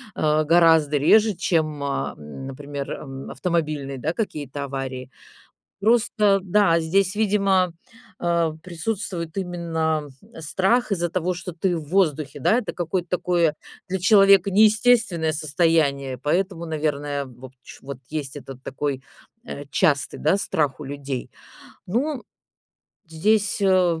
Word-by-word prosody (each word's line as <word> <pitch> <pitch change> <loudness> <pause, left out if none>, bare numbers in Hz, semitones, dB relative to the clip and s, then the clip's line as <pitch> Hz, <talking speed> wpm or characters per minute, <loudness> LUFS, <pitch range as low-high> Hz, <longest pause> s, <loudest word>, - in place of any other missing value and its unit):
э, 155 0 +2
гораздо 160 -2 +4
реже, 215 +9 +4
чем, 155 -5 0
э, 140 -1 -2
например, 135 - -7
м, 135 -1 -7
автомобильные, 155 -6 -2
да, 150 +6 -2
какие-то 145 - -4
аварии. 130 -2 -5 0.7
Просто, 210 -2 +3
да, 185 -3 +3
здесь, 190 +4 +1
видимо, 195 -4 +2 0.5
э, 170 -2 +1
присутствует 175 -1 -4
именно 165 -4 -2 0.3
страх, 195 +10 +1
из-за 175 -3 0
того, 180 +1 -1
что 180 +1 -6
ты 175 +2 -1
в 160 - -5
воздухе, 155 -6 0
да, 220 - +3
это 245 - -3
какое-то 175 +1 -3
такое 175 -3 +1 0.3
для 190 +1 -1
человека 195 -1 +6
неестественное 215 -5 +3
состояние, 150 -4 +1
поэтому, 175 +2 -1
наверное, 145 -2 -2
вот 130 0 -13
ч - - -13
вот 140 -1 -7
есть 150 -2 -5
этот 135 -2 -10
такой, 135 -1 -3 0.4
э, 145 - -7
частый, 145 -3 +1
да, 160 +5 +2
страх 150 -8 -1
у - - -6
людей. 140 -2 -5 0.6
Ну. 255 - -1 0.9
Здесь, 205 +6 +1
э, 185 -4 +3
165 Hz, 125 wpm, -23 LUFS, 145-190 Hz, 0.9 s, человека